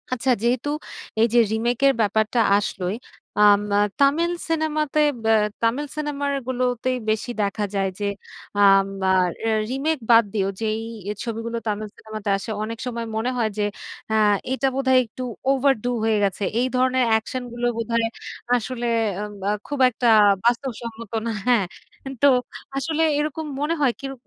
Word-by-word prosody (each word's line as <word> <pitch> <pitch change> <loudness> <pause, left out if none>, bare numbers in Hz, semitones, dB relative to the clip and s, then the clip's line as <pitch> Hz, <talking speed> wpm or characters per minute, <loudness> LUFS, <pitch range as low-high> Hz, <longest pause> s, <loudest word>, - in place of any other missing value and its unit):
আচ্ছা, 255 +1 -1
যেহেতু 245 +4 +1 0.5
এই 225 - +5
যে, - - +4
রিমেকের 240 +5 +2
ব্যাপারটা, 220 +3 +1 0.2
আসলোই 190 -1 -2 0.4
আম 205 -1 +6 0.2
আ - - +4 0.2
তামিল 300 +5 +3 0.2
সিনেমাতে 310 -2 0 0.2
বা 225 - +3 0.3
তামিল 245 +6 +1
সিনেমার 285 -2 -2 0.2
গুলোতেই 255 0 0
বেশি 220 +3 -1
দেখা 205 +1 -1
যায় 195 -1 +1
যে, 205 - -2 0.5
আম 195 -1 +6 0.2
আর 185 -1 +3 0.4
রিমেক 285 +5 0
বাদ 230 0 +7
দিও 195 -3 0
যে, - - 0 0.4
এই 210 - -3
ছবিগুলো 230 0 -4
তামিল 215 0 -2
সিনেমাতে 215 -1 -6
আসে 195 - -8
অনেক 225 +1 -5
সময় 235 -2 -3
মনে 220 +3 0
হয় 225 -2 +1
যে, 210 - +1 0.5
আ - - +1 0.4
এটা 265 +1 +1
বোধহয় 260 -1 +4
একটু 235 +3 -8 0.3
ওভারডু 270 -3 +2
হয়ে 220 -1 +2
গেছে। 200 +1 -1 0.2
এই 250 - +2
ধরনের 255 0 +2
অ্যাকশন 225 +3 0
গুলো 240 0 -3
বোধহয় 230 0 0 0.5
আসলে 240 +1 -3 0.4
আব 210 0 -5 0.2
আ - - +2 0.2
খুব 290 -1 -4
একটা 245 0 -1 0.4
বাস্তব 240 +3 +1
সম্মত 230 -2 -8
না। 230 - -1 0.2
হ্যা, 245 -1 +5 0.6
তো 285 - +7 0.5
আসলে 315 +3 -1 0.2
এরকম 305 +1 -2 0.2
মনে 300 +3 +1
হয় 270 -4 +4
কিরো 270 0 -5
235 Hz, 155 wpm, -23 LUFS, 220-270 Hz, 0.6 s, বাদ